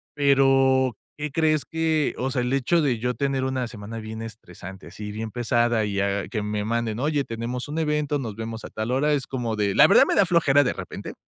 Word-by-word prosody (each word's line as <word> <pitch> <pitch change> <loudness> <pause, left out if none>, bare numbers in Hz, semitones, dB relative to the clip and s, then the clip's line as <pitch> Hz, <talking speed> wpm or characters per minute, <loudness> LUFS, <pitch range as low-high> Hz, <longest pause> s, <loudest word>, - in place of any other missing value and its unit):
Pero, 135 -3 +3 0.2
¿qué 150 -1 -4
crees?, 155 -1 +2
que, 160 -2 0
o 130 +1 -2
sea, 125 - 0
el 125 +1 -2
hecho 135 +5 +2
de 130 -5 +1
yo 125 +2 -1
tener 135 -1 -1
una 130 -2 -2
semana 115 0 -8
bien 110 0 -7
estresante, 95 -4 -10
así 105 -1 -8
bien 110 0 -5
pesada 120 -2 +1
y 100 -1 -1
a 100 0 -1
que 110 -4 -3
me 105 0 -3
manden: 115 -1 -1
"Oye, 145 +1 0
tenemos 120 +3 -5
un 155 +2 -3
evento, 150 -2 0
nos 110 -6 -5
vemos 115 0 -6
a - - -8
tal 110 +2 -4
hora", 145 +4 +2
es 140 -3 -1
como 120 -4 -3
de, 100 -2 0
la - - +8
verdad - - +7
me - - 0
da - - +5
flojera 145 -5 +4
de - - 0
repente. - - -7
125 Hz, 225 wpm, -24 LUFS, 110-140 Hz, 0.2 s, la